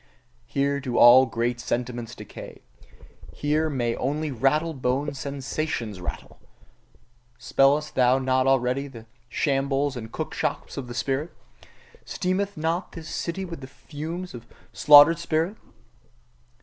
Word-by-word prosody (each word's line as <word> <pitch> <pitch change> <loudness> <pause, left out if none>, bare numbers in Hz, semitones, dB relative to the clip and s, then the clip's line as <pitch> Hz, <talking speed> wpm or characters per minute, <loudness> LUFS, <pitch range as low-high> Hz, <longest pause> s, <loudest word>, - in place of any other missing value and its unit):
Here 140 +3 0
do 130 -3 -3
all 130 +2 +8
great 120 +2 -2
sentiments 120 -1 -3
decay: - - -11 0.7
here 155 +2 0
may 120 -5 -1
only 150 +3 -2
rattle 150 +6 +1
boned 135 +2 -1
sensations 135 - -4
rattle! 90 - -7 1.0
Smellest 135 +4 +2
thou 125 0 +4
not 130 0 +1
already 135 +1 +1
the 115 -5 -12 0.2
shambles 140 0 0
and 110 -2 -7
cookshops - - -3
of 135 -3 -5
the 120 - -8
spirit? 140 +6 -2 0.7
Steameth 195 +1 -2
not 165 +4 -2
this 165 -3 -9
city 190 +3 -3
with 170 -5 -8
the 130 - -8
fumes 160 +6 -7
of 120 -1 -10 0.3
slaughtered 150 +3 +7
spirit? 165 +6 -1
140 Hz, 125 wpm, -25 LUFS, 125-155 Hz, 1.0 s, all